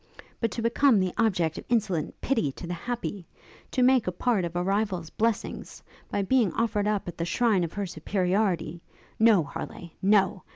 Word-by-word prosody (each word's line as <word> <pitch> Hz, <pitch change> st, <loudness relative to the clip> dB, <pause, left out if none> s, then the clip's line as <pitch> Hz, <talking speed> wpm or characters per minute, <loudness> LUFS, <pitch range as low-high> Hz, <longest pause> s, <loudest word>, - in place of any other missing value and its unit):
But 230 Hz, -, 0 dB
to 230 Hz, -, -3 dB
become 235 Hz, 0 st, +4 dB
the 185 Hz, -1 st, 0 dB
object 180 Hz, -8 st, +1 dB
of -, -, -11 dB
insolent 210 Hz, -9 st, 0 dB
pity 225 Hz, -, +1 dB
to -, -, -8 dB
the 175 Hz, -, -4 dB
happy! 205 Hz, -1 st, -5 dB, 0.4 s
to 255 Hz, -, +1 dB
make 255 Hz, -3 st, +4 dB
a -, -, +1 dB
part 200 Hz, 0 st, 0 dB
of 170 Hz, 0 st, -6 dB
a 175 Hz, -, 0 dB
rival's 195 Hz, -4 st, -1 dB
blessings, 225 Hz, -1 st, -2 dB, 0.3 s
by 200 Hz, -, -1 dB
being 225 Hz, -2 st, +2 dB
offered 210 Hz, -3 st, 0 dB
up 210 Hz, -3 st, -1 dB
at 175 Hz, -, -7 dB
the -, -, 0 dB
shrine 200 Hz, +1 st, +2 dB
of 170 Hz, -, -4 dB
her 205 Hz, -1 st, -2 dB
superiority 180 Hz, -2 st, -1 dB, 0.4 s
No, 220 Hz, -6 st, +5 dB
Harleigh, 170 Hz, +3 st, -8 dB
no! 195 Hz, -1 st, +3 dB
200 Hz, 180 wpm, -27 LUFS, 175-230 Hz, 0.4 s, No